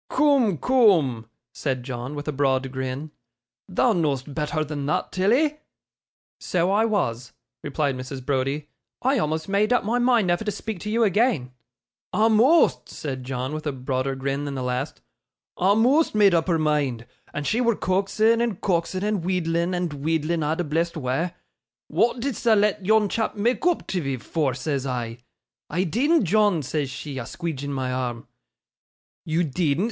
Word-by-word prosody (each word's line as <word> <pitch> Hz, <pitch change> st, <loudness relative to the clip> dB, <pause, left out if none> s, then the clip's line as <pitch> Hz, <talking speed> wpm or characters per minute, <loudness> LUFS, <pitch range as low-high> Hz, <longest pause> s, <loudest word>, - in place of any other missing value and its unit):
'Coom, 270 Hz, -, +3 dB
coom,' 165 Hz, -, +3 dB, 0.3 s
said 130 Hz, -4 st, -2 dB
John, 125 Hz, +2 st, -5 dB
with 145 Hz, +1 st, -6 dB
a -, -, 0 dB
broad 135 Hz, -2 st, 0 dB
grin; 130 Hz, +3 st, -4 dB, 0.6 s
'thou 220 Hz, +5 st, +2 dB
know'st 145 Hz, -5 st, -1 dB
betther 155 Hz, 0 st, -1 dB
than 145 Hz, -2 st, -4 dB
thot, 150 Hz, -, -1 dB
Tilly.' 260 Hz, +11 st, +2 dB, 0.8 s
'So 180 Hz, +1 st, 0 dB
I 215 Hz, +3 st, +3 dB
was,' 125 Hz, -, -1 dB, 0.3 s
replied 145 Hz, -1 st, -1 dB
Mrs. 130 Hz, 0 st, -7 dB
Browdie. 140 Hz, +2 st, -1 dB, 0.4 s
'I 265 Hz, 0 st, +3 dB
almost 160 Hz, -1 st, -1 dB
made 205 Hz, +3 st, +1 dB
up 245 Hz, -, +3 dB
my 230 Hz, +4 st, 0 dB
mind 240 Hz, -4 st, +3 dB
never 175 Hz, +3 st, +1 dB
to 215 Hz, -, -2 dB
speak 210 Hz, 0 st, -5 dB
to 210 Hz, -, -5 dB
you 230 Hz, +2 st, +2 dB
again.' 205 Hz, -, +2 dB, 0.6 s
'A'most!' 225 Hz, +9 st, +4 dB
said 130 Hz, -4 st, -5 dB
John, 130 Hz, +2 st, -3 dB
with 155 Hz, 0 st, -4 dB
a -, -, +1 dB
broader 130 Hz, 0 st, -2 dB
grin 140 Hz, +2 st, -2 dB
than 140 Hz, -1 st, -4 dB
the 130 Hz, -, -3 dB
last. 125 Hz, +4 st, -3 dB, 0.6 s
'A'most 225 Hz, -, +3 dB
made 205 Hz, -3 st, +5 dB
up 165 Hz, 0 st, +2 dB
her 170 Hz, -3 st, +2 dB
mind! 145 Hz, -7 st, 0 dB, 0.3 s
And 145 Hz, -, -4 dB
she 230 Hz, -, +1 dB
wur 235 Hz, -2 st, +2 dB
coaxin', 215 Hz, +5 st, +2 dB
and 230 Hz, -6 st, -1 dB
coaxin', 185 Hz, 0 st, -1 dB
and 210 Hz, -4 st, 0 dB
wheedlin', 175 Hz, -1 st, 0 dB
and 175 Hz, -3 st, -2 dB
wheedlin' 160 Hz, +3 st, -1 dB
a' 150 Hz, +1 st, 0 dB
the 175 Hz, -, -1 dB
blessed 165 Hz, +2 st, -1 dB
wa'. 135 Hz, +5 st, -1 dB, 0.6 s
"Wa'at 240 Hz, +1 st, +1 dB
didst 270 Hz, -3 st, -3 dB
thou 230 Hz, -2 st, +5 dB
let 205 Hz, -1 st, +2 dB
yon 215 Hz, +2 st, +4 dB
chap 220 Hz, +2 st, -2 dB
mak' 230 Hz, +5 st, 0 dB
oop 355 Hz, -, +1 dB
tiv'ee 140 Hz, -8 st, -2 dB
for?" 140 Hz, -1 st, -1 dB
says 135 Hz, +1 st, -2 dB
I. 120 Hz, -2 st, -3 dB, 0.5 s
"I 180 Hz, +4 st, 0 dB
deedn't, 260 Hz, -, +2 dB
John," 200 Hz, -3 st, +2 dB
says 145 Hz, +1 st, -2 dB
she, 135 Hz, +1 st, -6 dB
a 120 Hz, -, -5 dB
squeedgin 155 Hz, -5 st, -4 dB
my 130 Hz, -2 st, -2 dB
arm. 125 Hz, -2 st, -3 dB, 1.0 s
"You 160 Hz, +2 st, +1 dB
deedn't?" 155 Hz, -1 st, 0 dB
165 Hz, 170 wpm, -24 LUFS, 135-210 Hz, 1.0 s, made